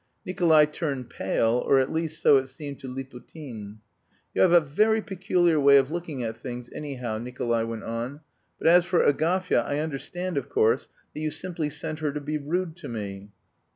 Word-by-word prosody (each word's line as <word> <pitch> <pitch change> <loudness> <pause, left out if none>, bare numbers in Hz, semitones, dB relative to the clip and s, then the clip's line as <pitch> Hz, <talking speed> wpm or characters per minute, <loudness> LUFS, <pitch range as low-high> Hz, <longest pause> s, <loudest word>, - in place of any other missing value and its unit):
Nikolay 165 -4 +4
turned 145 -4 -4
pale 115 +2 +1
or, 135 - +4
at 130 0 +2
least, 160 -1 -2
so 140 - +7
it 135 0 -1
seemed 140 +1 -8
to 135 - -8
Liputin. 125 -4 -9 0.5
"You - - +1
have 185 - +5
a 175 - +8
very 210 +9 +2
peculiar 180 -5 +1
way 140 0 +7
of 135 +1 +2
looking 165 -6 -4
at 115 -1 -3
things, 120 0 -7
anyhow," 125 -7 -4
Nikolay 120 -1 -1
went 115 -1 -5
on, 120 +6 -4 0.4
"but - - -9
as 175 +2 +7
for 180 0 +2
Agafya, 170 +2 +2
I 145 - -2
understand, 160 +4 -3
of - - -10
course, 445 +2 +2 0.2
that - - -6
you 155 0 -1
simply 165 -2 -3
sent 155 +1 -4
her 150 -2 -1
to 150 - -3
be 150 +1 -3
rude 165 +3 -2
to - - -8
me." 100 -3 -6
145 Hz, 190 wpm, -26 LUFS, 125-170 Hz, 0.5 s, a